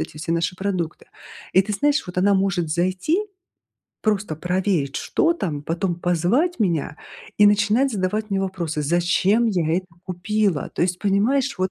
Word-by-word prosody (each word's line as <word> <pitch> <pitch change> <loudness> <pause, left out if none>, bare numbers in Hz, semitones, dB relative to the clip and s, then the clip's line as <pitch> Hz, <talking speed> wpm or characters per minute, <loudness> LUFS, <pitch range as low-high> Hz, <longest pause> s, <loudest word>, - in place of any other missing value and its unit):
эти 155 -1 -6
все 165 +1 -5
наши 170 +1 0
продукты. 185 -3 -3 0.5
И, 190 - +5
ты 210 - -4
знаешь, 290 +6 +1
вот 180 - -9
она 195 +2 +3
может 190 -4 0
зайти, 185 - 0 0.8
просто 205 -7 0
проверить, 180 -5 -1
что 335 - +1
там, 160 - -4
потом 170 +2 -1
позвать 180 - +1
меня 165 -6 0 0.4
и 210 - +7
начинать 210 +6 +3
задавать 210 +1 -2
мне 195 - 0
вопросы: 175 -5 -3
"Зачем 180 +8 +2
я 175 -5 +1
это 185 - -9 0.2
купила?" 185 -1 -1
То - - -1
есть, 180 0 -1
понимаешь, 230 +7 +1
вот, 185 0 0
185 Hz, 160 wpm, -22 LUFS, 175-210 Hz, 0.8 s, и